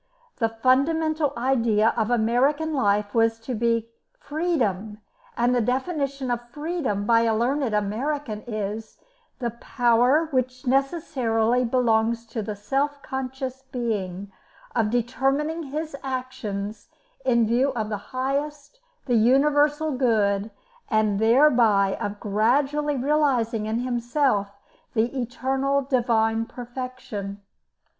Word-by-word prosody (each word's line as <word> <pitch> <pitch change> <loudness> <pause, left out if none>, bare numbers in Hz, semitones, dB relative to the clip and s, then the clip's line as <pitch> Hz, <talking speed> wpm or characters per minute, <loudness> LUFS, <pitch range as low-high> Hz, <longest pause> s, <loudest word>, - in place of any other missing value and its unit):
The 225 -2 +1
fundamental 290 +6 +2
idea 230 -4 +2
of 220 -1 0
American 255 +7 +2
life 205 -5 +1
was 225 0 +2
to 250 +3 -4
be 230 0 0 0.3
"Freedom," 235 - -1 0.4
and 245 +1 +2
the 245 - +2
definition 270 +1 -1
of 240 0 -3
"Freedom" 295 - -2
by 230 +1 +4
a 225 -1 +2
learned 250 0 0
American 215 +3 -2
is, 215 0 -4 0.4
"The 240 -2 -2
power 245 +5 +2
which 255 0 -1
necessarily 250 -4 +1
belongs 230 -1 +1
to 225 - -1
the 210 0 -4
self 275 +8 -2
conscious 265 0 -5
being 200 -6 -3 0.4
of 225 -3 +2
determining 270 +7 0
his 305 +1 -4
actions 250 -6 -4 0.4
in 235 -2 +3
view 245 +5 +2
of 215 -2 -2
the 210 - -2
highest, 285 - -3 0.3
the 250 - 0
universal 290 +6 +3
good, 215 -6 +1 0.4
and 215 -3 +2
thereby 225 -5 +4
of 205 0 -3
gradually 275 +8 +1
realising 255 -6 +1
in 225 +2 -1
himself 240 -3 0 0.5
the 230 +4 +1
eternal 265 +3 0
divine 230 -4 +1
perfection." 240 -6 -7
245 Hz, 115 wpm, -24 LUFS, 220-275 Hz, 0.5 s, by